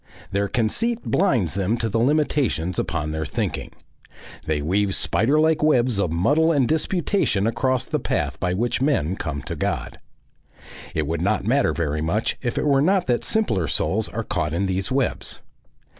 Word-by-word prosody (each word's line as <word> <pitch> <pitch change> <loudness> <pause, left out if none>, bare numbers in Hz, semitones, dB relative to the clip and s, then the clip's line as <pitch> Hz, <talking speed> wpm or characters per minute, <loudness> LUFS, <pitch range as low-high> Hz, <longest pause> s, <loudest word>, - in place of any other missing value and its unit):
Their 100 +1 0
conceit 220 - 0
blinds 125 - +1
them 100 +4 0
to 115 - -1
the 115 +1 0
limitations 130 - +1
upon 75 -2 -2
their 80 0 -2
thinking. - - -3 0.8
They 80 -1 0
weave 95 +6 +1
spider 135 +9 +2
like 160 0 +3
webs 125 -7 +3
of 90 -5 0
muddle 145 - +3
and 140 -6 +2
disputation 160 - 0
across 130 +3 0
the 150 - -2
path - - -2
by 90 0 0
which 120 +5 -1
men 115 - +1
come 70 -6 -4
to - - -5
God. - - -3 1.0
It 80 - 0
would 80 +2 -2
not 100 +2 0
matter 130 - +2
very 75 -1 -2
much 95 +8 0
if 120 -2 -3
it - - 0
were 140 -2 +4
not 185 +4 +2
that 120 -2 0
simpler 110 - 0
souls - - 0
are - - -4
caught 75 +1 -2
in 95 +3 0
these 95 +3 -2
webs. 130 -1 -1
110 Hz, 175 wpm, -23 LUFS, 90-140 Hz, 1.0 s, were